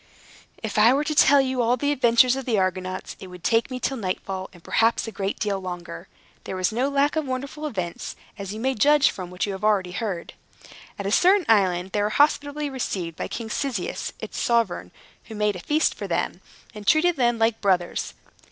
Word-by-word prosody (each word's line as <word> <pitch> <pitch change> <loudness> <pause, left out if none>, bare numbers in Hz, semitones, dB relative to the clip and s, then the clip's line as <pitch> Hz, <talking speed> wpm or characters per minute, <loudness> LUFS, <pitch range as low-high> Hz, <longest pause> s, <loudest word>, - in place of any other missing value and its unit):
If 215 -1 -1
I 230 +5 +6
were 290 - +1
to 305 +1 -2
tell 285 -1 +6
you 260 -1 -1
all 240 +2 +2
the 285 +3 0
adventures 250 -2 +4
of 270 -1 -5
the 230 -4 +1
Argonauts, 185 0 -2
it 190 - -9
would 180 -1 -12
take 230 +2 +2
me 255 -1 -4
till 270 +1 -2
nightfall, 190 -2 -4
and 175 -3 -17
perhaps 225 +1 +1
a - - -5
great 195 -1 -3
deal 205 -2 -1
longer. 175 - -7 0.4
There - - -5
was 185 +1 0
no 250 +5 0
lack 280 +2 +1
of 310 -3 -1
wonderful 280 +4 -4
events, 185 - -5 0.2
as 195 -1 -6
you 215 - -6
may 265 +3 0
judge 295 +5 +4
from 180 -2 -7
what 180 0 -2
you 205 - -3
have 190 +1 -7
already 200 -4 +2
heard. 185 -3 -4 0.6
At 200 - -5
a 200 - -1
certain 370 - +4
island, 190 -4 +2
they 205 - 0
were 205 - +1
hospitably 290 +3 +2
received 190 - -4
by - - -4
King 225 -2 -6
Cyzicus, 250 -10 -3
its - - -6
sovereign, 230 - +1 0.4
who 220 - -9
made 210 -1 +1
a - - -6
feast 300 - +1
for - - -6
them, - - -2 0.3
and 210 -2 -10
treated 345 +2 +4
them 240 -3 +2
like 225 0 +1
brothers. 180 -3 0
225 Hz, 210 wpm, -24 LUFS, 190-270 Hz, 0.6 s, I